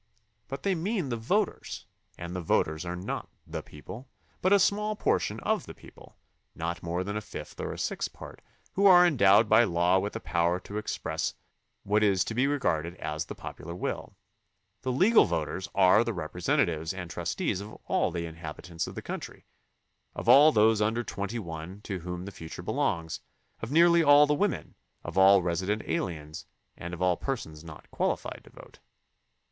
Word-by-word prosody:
But 135 +1 -6
they 195 - +2
mean 185 - -2
the 120 - -1
voters, 185 - -1 0.3
and 85 +1 -6
the 90 - -2
voters 80 0 0
are 90 - -3
not 90 +3 -5 0.2
the - - -5
people, 115 - -11 0.3
but 185 - +2
a 200 - +8
small 210 +2 +1
portion - - 0
of - - -1
the - - -9
people, - - -16 0.4
not 85 0 -3
more 85 +2 -2
than 100 +2 -4
a 105 - -2
fifth - - -9
or - - -3
a - - -7
sixth - - -2
part, - - -11 0.3
who 200 +1 +4
are 180 -2 +8
endowed 105 - +5
by 120 - +6
law 90 -2 +2
with 105 +2 -3
the 115 - -4
power 85 -3 0
to 105 +2 -5
express 105 - -3 0.5
what 105 +2 +2
is 100 -3 +3
to - - -5
be 125 +4 +2
regarded 85 - 0
as 75 -2 -4
the - - -8
popular 85 - -8
will. - - -4 0.7
The 130 - -2
legal 195 - +5
voters 80 +4 -3
are 95 +3 +6
the 115 0 -2
representatives 85 0 -1
and 90 -2 -5
trustees 90 - -2
of 105 +2 -9
all - - +1
the 85 0 -3
inhabitants 80 +1 -6
of - - -8
the - - -6
country, - - -7 0.7
of - - -6
all 150 +3 +8
those 110 -1 +4
under 110 +3 +1
twenty 100 +2 -4
one 85 -1 -7
to 95 -3 -4
whom 90 +1 -6
the 100 - -7
future 80 -3 -9
belongs, 80 -1 -1 0.4
of 115 - -5
nearly 170 +2 +6
all 145 -1 +7
the 150 - +1
women, 195 +5 -1 0.3
of - - -7
all 95 0 +6
resident 95 +5 -1
aliens, 75 -4 -4 0.3
and 85 +1 -6
of 90 - -4
all 90 -1 +3
persons 80 - -5
not 80 -2 -11
qualified - - -2
to - - -15
vote. - - -15
95 Hz, 185 wpm, -28 LUFS, 85-130 Hz, 0.7 s, a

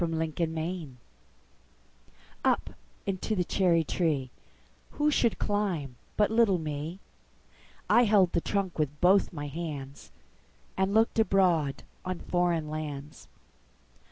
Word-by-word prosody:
9. 160 -1 -1
Foreign 165 0 -1
Lands 160 -5 -4 1.5
UP - - +1 0.3
into 195 +2 -2
the 180 - +1
cherry 175 -2 +2
treeWho 160 - -3
should 235 -6 +2
climb 185 -11 -1 0.2
but 210 +1 +3
little 220 -4 +4
me?I 160 +9 -3
held 200 -5 +4
the 170 - +1
trunk 195 -3 -2
with 150 -1 -1
both 190 +2 +4
my 145 -4 -5
handsAnd 145 -3 -6 0.8
looked 220 +3 +2
abroad 175 -9 +2 0.2
on 185 -1 -3
foreign 175 -3 0
lands. 150 -1 -6
170 Hz, 105 wpm, -29 LUFS, 150-195 Hz, 1.5 s, little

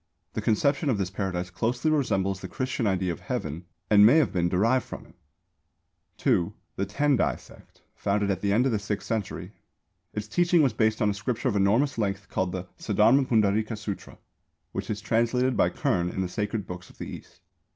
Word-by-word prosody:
The - - -2
conception 140 +7 +1
of 120 - +2
this 95 -2 -2
Paradise 90 -2 -3
closely 120 - 0
resembles 100 -10 0
the - - -5
Christian 130 -3 -2
idea 95 -2 0
of 85 - -6
Heaven 80 +4 -4 0.2
and 105 -1 +6
may 120 +9 +7
have 160 - +2
been 85 -2 +1
derived 115 +8 +2
from - - -9
it. - - -19 1.0
(2) 85 -1 +1 0.2
The 100 - -2
Tendai 140 +5 +1
Sect, - - -18
founded 100 0 0
at 95 -1 -2
the 100 - +1
end 115 +6 +3
of 135 - +2
the 110 - 0
sixth 105 -1 -4
century. 100 -4 -3 0.6
Its 105 0 -5
teaching 170 +7 +3
was 130 -6 +2
based 110 0 +1
on 105 - +3
a - - -2
scripture 120 +5 -2
of 105 - -2
enormous 115 +7 +2
length 100 -2 -2
called 95 -1 -1
the 90 0 -4 0.2
Saddharma 115 +6 +3
Pundarīka 110 -1 +2
Sūtra, 105 -2 -6 0.5
which - - -5
is 105 -1 -3
translated 120 +5 +1
by - - +3
Kern 85 0 0
in 95 - -3
the 95 - -1
Sacred 105 +1 -2
Books 90 -1 -8
of - - -19
the - - -6
East. - - -11
105 Hz, 195 wpm, -27 LUFS, 95-120 Hz, 1.0 s, may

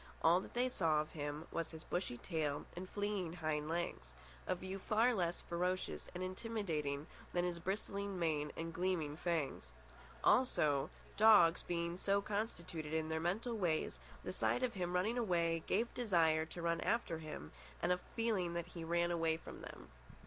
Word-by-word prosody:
All 170 +2 +6
that 190 - -10
they 250 +1 +3
saw 165 -11 +2
of 155 +1 -2
him 145 +1 -4
was 165 -1 -2
his 160 0 -9
bushy 175 -9 -2
tail 150 -2 -1
and 185 +1 -6
fleeing 205 -5 -1
hind 155 -3 -1
legs—a 60 - -4
view 190 +2 -5
far 225 +5 +3
less 175 -5 0
ferocious 180 +2 -1
and 180 - -2
intimidating 185 -8 -2 0.3
than 175 0 +2
his 175 -1 -2
bristling 200 +1 -2
mane 155 -3 0
and 165 0 -3
gleaming 175 -5 0
fangs. 160 -4 -1 0.5
Also, 150 - +4 0.3
dogs 210 -6 +7
being 170 0 -2
so 200 +1 +3
constituted 175 -7 -3
in 160 0 0
their 160 0 0
mental 205 +8 0
ways, 175 -7 0 0.2
the - - -4
sight 250 - +1
of 250 -2 +1
him 180 -2 -2
running 215 +7 +2
away 170 -6 +2
gave 230 +4 +1
desire 165 -9 +3
to 170 +1 -7
run 170 0 +1
after 225 -8 0
him 150 - -7 0.3
and - - +1
a 180 - +3 0.2
feeling 205 -7 +1
that 170 -1 -1
he 170 -2 -6
ran 170 +1 +2
away 165 -2 +2
from - - -10
them. - - -9
170 Hz, 170 wpm, -38 LUFS, 160-195 Hz, 0.5 s, dogs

